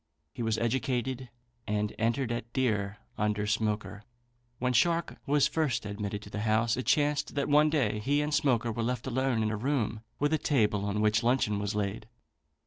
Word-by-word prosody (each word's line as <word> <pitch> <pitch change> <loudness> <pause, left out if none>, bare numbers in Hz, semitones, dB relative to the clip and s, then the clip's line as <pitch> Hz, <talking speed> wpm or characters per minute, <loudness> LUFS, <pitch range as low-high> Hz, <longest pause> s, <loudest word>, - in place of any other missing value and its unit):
He - - -6
was 110 -1 0
educated 125 +1 -1 0.4
and 105 0 -1
entered 115 +2 0
at 120 0 -4
deer 105 -6 0 0.2
under 105 -1 0
Smoaker. 105 -1 -1 0.6
When 125 +1 0
Shark 170 +7 +2
was 145 0 +4
first 150 -9 -1
admitted 105 0 -4
to 100 - -11
the 105 - -4
house, 110 +1 +2
it 130 - -4
chanced 145 -1 +1
that 140 - 0
one 150 +1 +5
day 120 -9 +1
he 140 +7 +1
and 150 +1 -2
Smoaker 120 -6 +2
were 115 - -3
left 125 +1 -2
alone 130 -3 0
in 110 - 0
a 110 - -2
room 115 -3 -1 0.2
with 145 +2 +1
a 155 - +2
table 105 -7 +1
on 100 +1 -1
which 110 +1 +3
luncheon 120 -4 +1
was 100 +1 -2
laid. 105 +1 -2
115 Hz, 185 wpm, -29 LUFS, 105-130 Hz, 0.6 s, one